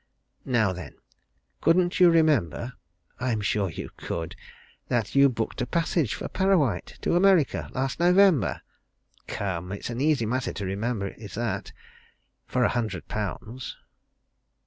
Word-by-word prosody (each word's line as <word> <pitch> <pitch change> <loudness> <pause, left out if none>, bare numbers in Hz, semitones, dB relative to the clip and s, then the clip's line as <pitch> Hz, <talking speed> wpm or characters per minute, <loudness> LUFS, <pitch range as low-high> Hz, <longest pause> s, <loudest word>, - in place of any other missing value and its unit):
Now 110 -7 +2
then 90 -5 -8 0.7
couldn't 175 +1 +3
you 180 -1 +8
remember 130 - +2 0.5
I'm 120 -3 0
sure 105 -2 0
you 75 - -7
could 85 -1 -4 0.5
that 115 -4 -1
you 140 0 +6
booked 115 -2 -3
a 125 - -1
passage 165 - 0
for - - -5
Parrawhite 165 - +1
to - - +2
America 180 -5 +3
last 130 +2 -2
November? 180 -2 +4 0.6
Come! 90 -2 -3
It's 100 +4 -5
an 120 +2 -3
easy 145 -5 +2
matter 125 +3 -1
to 100 - -4
remember 100 +1 -2
is 105 0 -10
that 105 -4 -3 0.8
for 125 - +1
a - - +4
hundred 120 -3 -2
pounds." 110 +4 -5
120 Hz, 135 wpm, -26 LUFS, 100-155 Hz, 0.8 s, you